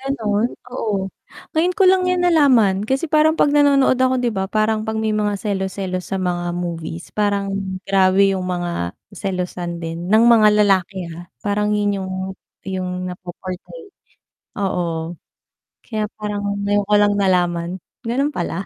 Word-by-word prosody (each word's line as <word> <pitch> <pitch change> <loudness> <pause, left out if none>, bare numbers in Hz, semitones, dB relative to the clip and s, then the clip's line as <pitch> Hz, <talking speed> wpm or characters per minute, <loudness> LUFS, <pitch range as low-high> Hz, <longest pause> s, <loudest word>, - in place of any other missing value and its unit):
Gano'n? 235 -5 0 0.2
Oo. 200 -6 -2 0.5
Ngayon 350 +3 +3
ko 395 - +3
lang 370 -1 +4
'yan 365 -1 +1
nalaman. 255 - +4
Kasi, 270 +7 -1
parang 310 +1 +4
'pag 295 - +3
nanonood 285 -3 +4
ako, 260 0 +2
'di 240 -1 +1
ba, 190 -3 -2
parang, 215 +1 0
'pag 220 0 -3
may 220 0 0
mga 210 -1 0
selos-selos 190 -2 -3
sa 190 - 0
mga 175 -1 -1
movies, 170 -1 -5
parang, 200 -1 0 0.3
grabe 195 0 +4
'yong 185 - -3
mga 175 - -2 0.2
selosan 180 -3 -3
din, 165 +1 -5
ng 225 +2 +6
mga 220 -2 +7 0.2
lalaki, 190 -2 +1
ha. 175 +1 -11
Parang 210 +1 0
'yon 205 -1 +1
'yong 185 0 -5 0.6
'yong 185 -1 -3 0.2
napo-portray, 185 - -8 0.7
oo. 170 -3 -2 0.7
Kaya, 215 -2 -2
parang 210 -1 -3 0.2
ngayon 205 0 +2
ko 210 - +3
lang 205 0 +4
nalaman, 175 -2 +1 0.3
gano'n 270 +5 0
pala. 175 +2 -3
200 Hz, 150 wpm, -20 LUFS, 180-230 Hz, 0.7 s, mga